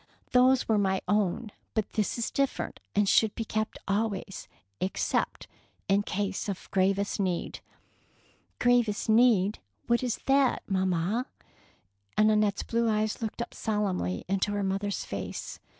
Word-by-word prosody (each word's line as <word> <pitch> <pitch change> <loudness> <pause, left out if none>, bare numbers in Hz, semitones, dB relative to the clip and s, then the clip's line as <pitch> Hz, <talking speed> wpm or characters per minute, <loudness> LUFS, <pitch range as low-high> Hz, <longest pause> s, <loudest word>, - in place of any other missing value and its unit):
"Those 255 +1 +4
were 220 -2 +3
my 190 -1 +1
own, 205 +2 0 0.2
but 220 -2 -1
this 215 0 0
is 235 - -2
different, 275 -1 -1 0.2
and 205 0 +3
should 220 +1 +4
be 225 - -3
kept 215 0 -2
always, 200 -1 -2 0.3
except 185 - -1 0.4
in 200 +1 +3
case 200 0 -2
of 195 - -6
gravest 195 +2 +1
need." 185 -3 -1 1.0
"Q 245 - +4
ravest 210 -1 -3
need 220 -3 +4
— 105 - -44
what 235 0 +2
is 250 -3 -1
that, 270 -1 +3
mam 190 -1 +1
mal" 185 +8 0 0.9
and 215 0 +5
Annette's 210 -2 +2
blue 230 0 +1
eyes 215 0 0
looked 225 +1 -3
up - - -11
solemnly 195 - -1
into 195 +2 0
her 205 0 -1
mother's 195 +1 -2
face. - - -5
210 Hz, 150 wpm, -28 LUFS, 195-225 Hz, 1.0 s, and